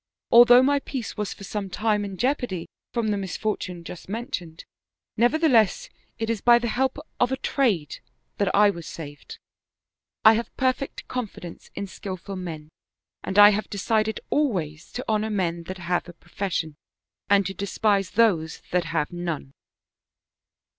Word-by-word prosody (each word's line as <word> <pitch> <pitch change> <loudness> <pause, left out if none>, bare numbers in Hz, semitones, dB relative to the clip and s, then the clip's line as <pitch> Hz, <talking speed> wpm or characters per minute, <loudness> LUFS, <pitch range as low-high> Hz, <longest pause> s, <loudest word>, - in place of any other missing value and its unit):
Although 245 +1 +8
my 285 +1 +3
peace 265 -4 -5
was 210 -2 -3
for - - -9
some 200 0 -4
time 210 +1 0
in 195 -2 -6
jeopardy 245 - -1 0.3
from 235 -3 -1
the 205 - +1
misfortune 190 -2 -3
just 175 +1 -10
men 235 +5 -4
tioned, 165 - -5 0.5
nevertheless 240 - +3 0.3
it 225 - -2
is 225 -3 -1
by 240 -1 +7
the 235 -1 -2
help 260 +4 0 0.2
of 245 +1 +2
a 265 - 0
trade 215 - 0 0.4
that 200 -2 +2
I 205 0 +6
was 170 -4 -9
saved. 145 -3 -9 0.9
I 220 - +10
have 230 +1 -3
perfect 260 +1 -1
confidence 215 -8 -6
in 200 - -3
skillful 195 0 -7
men 160 -5 -6 0.5
and 190 - -3
I 205 0 +10
have 210 +1 -2
decided 215 +1 0
always 175 - -1
to 250 - -5
honor 215 0 +1
men 170 -5 -1
that 185 +2 -6
have 175 0 -2
a - - -9
pro - - -25
fession, 170 -5 -2 0.6
and 200 -1 +4
to 195 - -3
despise 200 0 0
those 190 -7 +1
that 180 -1 +1
have 155 -3 -1
none." 170 -6 -4
200 Hz, 160 wpm, -25 LUFS, 175-230 Hz, 0.9 s, I